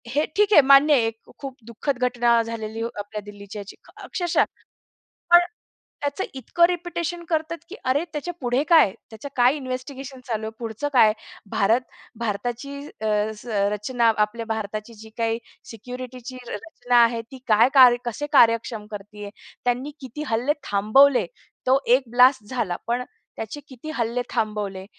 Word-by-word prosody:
हे 300 +2 +3
ठीक 415 +1 +3
आहे 300 - +9
मान्य 275 +2 +6
आहे, 245 -5 +4
एक 225 0 -6 0.2
खूप 270 -2 -7
दुःखद 235 +4 -3
घटना 240 -1 +3
झालेली 225 -1 -5
आपल्या 210 -2 -5
दिल्लीची 205 0 -10
ह्याची 200 0 -9 0.3
अक्षरशः 350 -2 +1 0.9
पण, 345 0 +9 0.6
त्याचं 285 +6 -2
इतकं 270 +6 +1
रिपिटेशन 345 -1 -3
करतात, 320 0 -1
की 390 - -9
अरे 270 +5 +1
त्याच्या 310 +4 -4
पुढे 250 +1 +1
काय. 320 - +6 0.2
त्याचं 220 +5 -8
काय 250 +2 +5
इन्व्हेस्टिगेशन 265 0 -6
चालू 220 -2 -3
आहे, - - -4
पुढचं 230 +4 -4
काय? 220 -5 +6 0.4
भारत 220 +4 +3 0.4
भारताची 235 +6 -3
अ, 220 - -7 0.7
रचना 230 +3 +1
आपल्या 215 +2 -1
भारताची 215 0 -4
जी 220 - -12
काही 225 0 0 0.3
सिक्युरिटीची 250 +2 -8
र - - -5
रचना 245 +4 -2
आहे, 230 0 0
ती 245 +4 -13
काय 220 +2 +6
कार्य 250 -3 +8
कसे 240 +5 -3
कार्यक्षम 230 -4 +3
करतीये? 205 0 -8 0.3
त्यांनी 245 +4 0
किती 265 +2 -7
हल्ले 235 +6 +1 0.2
थांबवले? 230 +7 +4 0.4
तो 260 +1 +5 0.2
एक 270 - -4
ब्लास्ट 250 0 +5
झाला 220 -9 -2
पण 240 +2 -1 0.3
त्याचे 225 +6 -6
किती 265 +3 -9
हल्ले 235 0 -1
थांबवले? 205 -3 -2
245 Hz, 150 wpm, -23 LUFS, 220-275 Hz, 0.9 s, आहे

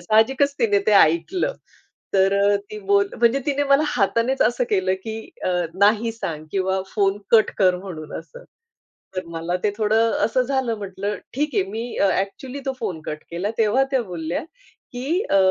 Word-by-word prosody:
साहजिकच 255 +9 +3
तिने 210 -4 +3
ते 215 - +4
ऐकलं 200 - +3 0.6
तर 200 +1 +4
ती 215 - -6
बोल 200 0 +3
म्हणजे 240 +3 +3
तिने 285 0 +1
मला 275 +2 +6
हातानेच 235 +2 +1
असं 240 +1 +1
केलं 190 -2 +2
की 220 -1 -4 0.3
अ, - - +1 0.3
"नाही 210 +4 +3
सांग" 160 -9 -5
किंवा 190 0 0
"फोन 200 -2 +2
कट 225 -2 +5
कर" 185 -2 +4
म्हणून 175 -5 -8
असं. - - -12 0.7
तर 185 - -2
मला 170 +1 -3
ते 210 - +3
थोडं 220 +1 +2
असं 255 +3 +2
झालं 260 -3 -1
म्हटलं 200 +1 -4 0.2
"ठीक 295 +2 -1
आहे" - - +3
मी 230 +3 -5
अ, 200 - +3
एक्चुअली 255 +8 -6
तो 270 - 0
फोन 180 -8 -3
कट 155 0 -5
केला. 180 +5 -2
तेव्हा 225 +5 +3
त्या 260 -2 +2
बोलल्या 170 - -4 0.5
की 280 +10 -1
अ, 195 - +4
210 Hz, 170 wpm, -22 LUFS, 190-245 Hz, 0.7 s, मला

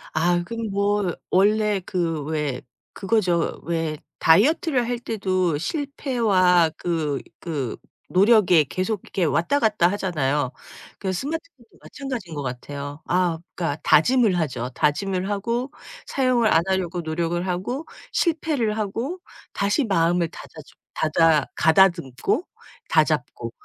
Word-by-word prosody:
아 175 +2 +2
그거 230 +2 -5
뭐 200 -2 0 0.2
원래 210 +1 +3
그 165 -5 -1
왜 150 -4 -2 0.3
그거죠. 185 -5 0
왜 165 -2 -2 0.2
다이어트를 250 - +3
할 245 -1 -2
때도 185 -8 -1
실패와 220 - +2
그 155 -5 -1 0.2
그 145 -8 -3 0.3
노력에 190 -4 +5
계속 185 +8 -2
이렇게 185 - -2
왔다 170 - +1
갔다 210 -7 +3
하잖아요. 150 -9 -1 0.5
그 190 -1 -2
스마트폰도 280 - -6
마찬가지인 250 - -6
것 145 - -4
같아요. 140 +3 -6
아 175 -2 +1 0.2
그러니까 165 -4 -2
다짐을 220 +2 +4
하죠. 130 -6 -2
다짐을 185 +5 0
하고 235 +7 -2 0.3
사용을 250 -4 +2
안 165 - +5
하려고 185 -2 -1
노력을 170 +2 -2
하고 245 - -3 0.2
실패를 300 -10 0
하고 230 - -3 0.3
다시 205 +8 +1
마음을 170 -3 +2
다자졌 155 -2 -13 0.2
다다 155 -2 +3
가다듬고 170 - +2 0.4
다잡고 - - 0
185 Hz, 265 characters per minute, -23 LUFS, 160-225 Hz, 0.5 s, 노력에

